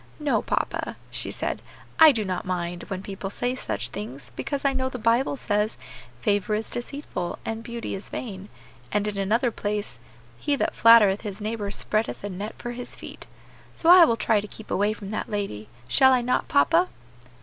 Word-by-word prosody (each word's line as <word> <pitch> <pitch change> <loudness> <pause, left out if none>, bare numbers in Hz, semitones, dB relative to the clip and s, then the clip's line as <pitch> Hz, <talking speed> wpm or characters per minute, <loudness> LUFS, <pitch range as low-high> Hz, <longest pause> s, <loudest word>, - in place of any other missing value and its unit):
"No, 295 -2 +1
papa," - - -2 0.2
she - - 0
said, - - -3 0.4
"I 320 -1 +10
do 220 -6 -1
not 185 -2 -2
mind, 175 -1 -3
when 190 0 -4
people 195 0 -5
say 245 +5 -1
such 255 - -3
things, 140 -11 -7
because 280 -1 -3
I 275 - +3
know 260 0 -1
the 255 - -6
Bible 240 +4 +2
says, 210 -2 0 0.4
'Favor 205 - +1
is 220 +1 -3
deceitful, 240 -8 -4
and 225 0 -3
beauty 235 0 -5
is 195 - -6
vain;' 200 -4 -6 0.4
and 210 0 +1
in 205 -1 -3
another 230 +6 +2
place, 205 - -3 0.4
'He 290 - +1
that - - 0
flattereth 220 -4 +6
his 205 -2 -6
neighbor 210 -1 -3
spreadeth 215 +2 -1
a 205 - -3
net 200 +4 -5
for 240 - -5
his 245 0 -7
feet.' - - -10 0.5
So 335 - +5
I 360 -1 +10
will 230 -6 +1
try 215 -1 +2
to 210 - -8
keep 220 - -11
away 205 +2 +2
from 205 -2 -8
that 215 - -3
lady; 195 - -4 0.2
shall 265 -1 +5
I 250 - +3
not, 250 +1 0
papa?" 330 +5 +4
215 Hz, 190 wpm, -25 LUFS, 200-245 Hz, 0.5 s, I